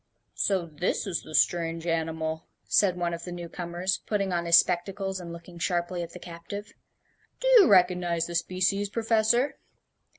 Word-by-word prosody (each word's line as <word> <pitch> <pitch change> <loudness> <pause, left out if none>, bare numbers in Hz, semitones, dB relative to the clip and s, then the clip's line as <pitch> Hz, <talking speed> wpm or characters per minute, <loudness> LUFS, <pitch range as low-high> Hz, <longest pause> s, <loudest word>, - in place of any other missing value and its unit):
"So 190 -4 0
this 160 +2 -2
is 185 -4 -2
the 155 - -8
strange 165 -1 +1
animal," 160 -1 -2 0.2
said 185 -3 +2
one 175 -1 -1
of 170 0 -6
the 180 - -7
new 175 -1 -6
comers, 175 +2 -3
putting 200 -3 0
on 170 -1 -1
his 170 0 +8
spectacles 190 +2 0
and 170 -2 -8
looking 170 +1 -11
sharply 175 0 -1
at 170 -1 -7
the - - -8
captive; 180 +5 -8 0.7
"do - - -2
you 385 - +7
recognize 180 -3 +3
the 175 - -7
species, 185 +4 0
Professor?" 230 +4 +1
175 Hz, 165 wpm, -27 LUFS, 170-195 Hz, 0.7 s, his